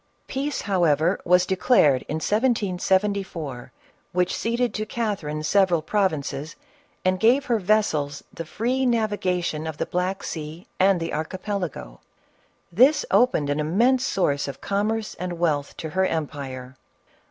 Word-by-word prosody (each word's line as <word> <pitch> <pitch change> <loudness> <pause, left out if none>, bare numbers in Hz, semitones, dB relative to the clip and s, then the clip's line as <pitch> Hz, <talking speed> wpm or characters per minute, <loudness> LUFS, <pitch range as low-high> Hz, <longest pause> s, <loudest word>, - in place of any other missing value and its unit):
Peace 280 +2 -3
however 175 -3 +2
was 180 +1 +4
de 190 - 0
clared, 150 - +4
in 155 - -1
1774, 190 - 0 0.4
which 180 0 +1
ceded 235 +2 -1
to 215 - -2
Catherine 200 -10 -3
several 180 -1 +3
prov 195 +3 +2
inces, 150 0 -5 0.5
and 185 0 +2
gave 250 +6 +4
her 235 -4 +1
vessels 170 -8 0
the 165 - -5
free 245 +10 -1
navigation 190 -9 0
of 160 -2 -5
the - - -1
Black 185 +2 -2
Sea 160 +2 -6
and 190 -1 +4
the 165 0 -4
Archipelago; 160 - -4 0.7
this 260 - +4
opened 160 - +3
an 145 - -1
im 155 +5 -2
mense 255 +2 +4
source 145 - 0
of 140 -1 -7
commerce 210 +2 -1
and 180 -1 -4
wealth 150 -4 -1
to 160 - -6
her 190 +3 +2
empire. 135 -5 -5
180 Hz, 140 wpm, -24 LUFS, 155-210 Hz, 0.7 s, was